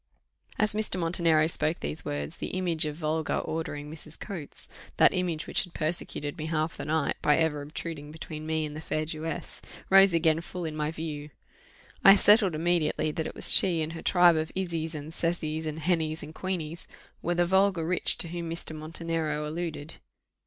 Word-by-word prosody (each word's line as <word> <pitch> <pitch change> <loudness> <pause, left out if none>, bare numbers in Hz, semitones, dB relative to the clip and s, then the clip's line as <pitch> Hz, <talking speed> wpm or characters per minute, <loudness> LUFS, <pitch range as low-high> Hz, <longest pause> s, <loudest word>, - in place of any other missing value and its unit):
As 215 -1 +2
Mr. 210 -3 0
Montenero 165 -2 +3
spoke 155 0 +1
these 75 +1 -3
words, 75 0 -4
the - - -4
image 170 -4 +1
of 150 - -4
vulgar, 155 -1 -1
ordering 150 -2 -4
Mrs. 155 0 -6
Coates 175 -9 -6 0.3
that - - +6
image 175 -3 -2
which - - 0
had 180 -3 -13
persecuted 155 -1 -3
me 155 - -3
half 155 0 -1
the - - -6
night, 160 +1 0
by 150 - +4
ever 160 -3 +1
obtruding 150 0 -7
between 155 -1 -8
me 160 -1 0
and 150 0 -7
the 155 - -6
fair 155 -1 -2
Jewess 155 0 -5 0.3
rose 195 0 +8
again 165 -1 +2
full 175 0 -6
in 155 -1 -4
my 150 0 -1
view. 155 -2 -6 0.7
I 195 - +10
settled 205 -3 +5
immediately, 160 -1 +1
that 160 +1 -3
it - - -8
was - - +4
she 170 -4 +5
and 155 +1 -5
her 165 - -7
tribe 175 -2 +5
of 155 0 -2
Issys, 165 -4 -2
and 150 +2 -7
Cecys, 160 -2 -1
and 155 0 -4
Hennys, 160 -2 0
and 155 +1 -9
Queeneys, 170 -3 -4 0.3
were 175 - -1
"the 175 0 +3
vulgar 190 -2 +2
rich" 180 +2 +1
to 165 - +4
whom 170 -1 -5
Mr. 165 -1 -4
Montenero 155 -1 -3
alluded. 160 -1 -5
160 Hz, 190 wpm, -28 LUFS, 155-175 Hz, 0.7 s, I